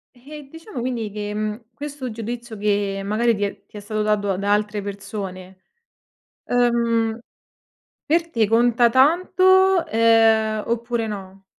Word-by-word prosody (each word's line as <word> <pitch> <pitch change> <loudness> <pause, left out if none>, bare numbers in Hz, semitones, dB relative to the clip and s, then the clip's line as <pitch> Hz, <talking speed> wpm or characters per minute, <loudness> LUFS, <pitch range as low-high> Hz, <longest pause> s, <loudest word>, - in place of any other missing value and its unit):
Eh, 285 +3 -12
diciamo 325 - -9
quindi 235 -3 -3
che, 210 0 -5
mhmm, 215 +2 -3
questo 280 +1 -6
giudizio 230 +1 -6
che 200 -1 -1
magari 225 +3 +1
ti 205 - -3
è 200 - -5
ti - - -13
è - - -6
stato 215 +1 -3
dato 205 -2 0
da 200 +1 +1
altre 210 0 -1
persone, 195 -2 -7 0.9
ehm, 235 -2 +1 0.9
per 335 +2 +1
te 225 -8 +1
conta 235 +2 +3
tanto, 365 +7 +4
ehm, 225 -1 +3
oppure 235 0 -2
no? 195 -2 -8
225 Hz, 135 wpm, -22 LUFS, 205-245 Hz, 0.9 s, tanto